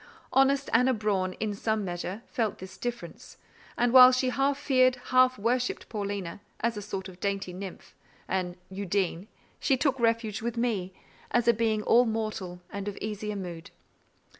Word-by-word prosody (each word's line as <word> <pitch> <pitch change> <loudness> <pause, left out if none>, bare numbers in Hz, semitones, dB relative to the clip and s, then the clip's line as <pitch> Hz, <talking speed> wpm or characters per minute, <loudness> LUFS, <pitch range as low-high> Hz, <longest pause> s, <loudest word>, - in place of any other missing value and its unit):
Honest 270 +1 +3
Anna 250 +2 +4
Braun, 195 -4 0
in 215 +1 -3
some 215 0 -1
measure, 180 +4 -5
felt 225 -4 -2
this 190 +1 -10
difference; 240 -8 -6 0.4
and 240 0 +2
while 255 -1 +10
she 255 0 +1
half 275 +2 +1
feared, 255 -3 +3
half 255 0 +3
worshipped 245 +4 -1
Paulina, 200 -4 -4 0.2
as 235 0 0
a 205 - -5
sort 195 -2 -5
of 185 -1 -12
dainty 195 -2 -2
nymph—an 185 -1 -6 0.2
Undine—she 195 - -2
took 270 -1 +1
refuge 230 -2 +1
with 235 +1 -3
me, 215 -6 -1 0.4
as 240 -1 +1
a 235 - +7
being 220 -1 0
all 245 +3 +5
mortal, 215 -5 -3
and 200 0 -5
of 205 - -4
easier 210 0 -4
mood. 175 -4 -6
215 Hz, 155 wpm, -28 LUFS, 195-245 Hz, 0.4 s, while